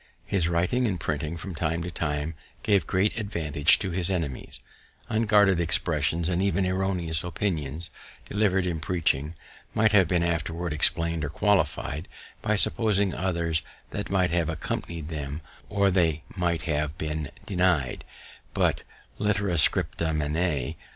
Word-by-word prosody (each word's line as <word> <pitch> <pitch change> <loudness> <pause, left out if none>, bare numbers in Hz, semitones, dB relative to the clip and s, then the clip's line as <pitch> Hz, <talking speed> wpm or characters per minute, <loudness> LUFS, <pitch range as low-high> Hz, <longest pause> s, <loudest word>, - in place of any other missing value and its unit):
His 85 -4 +1
writing 90 +9 +1
and 95 -5 -2
printing 75 +2 -2
from 90 +3 -6
time 80 +1 -1
to 90 - -5
time 75 0 -2 0.3
gave 100 -6 +2
great 100 +5 +1
advantage 80 -8 +2
to 95 -3 -2
his 85 0 -1
enemies; 80 -9 -3 0.5
unguarded 105 -4 +4
expressions, 80 -1 +1
and 90 0 0
even 95 -1 +1
erroneous 90 -4 0
opinions, 85 -4 -3 0.4
delivered 100 -3 +1
in 85 -3 -1
preaching, 80 -2 0 0.4
might 110 0 +4
have 100 -5 +5
been 85 +1 +1
afterwards 85 0 -1
explain'd 85 +1 +1
or 75 - -2
qualifi'd 95 -3 0 0.3
by - - +1
supposing 100 +1 +3
others 85 -3 0 0.3
that 105 - -4
might 90 -3 +2
have 85 -2 +1
accompani'd 80 0 -4
them, 75 -1 -5 0.3
or 100 -1 +2
they 80 -4 +2
might 85 -4 0
have 75 -1 -1
been 75 -2 -3 0.2
deny'd; 90 -9 +1 0.5
but - - +2 0.4
litera 105 -3 +1
scripta 80 0 +3
manet. 75 -2 -1
85 Hz, 135 wpm, -26 LUFS, 80-95 Hz, 0.5 s, have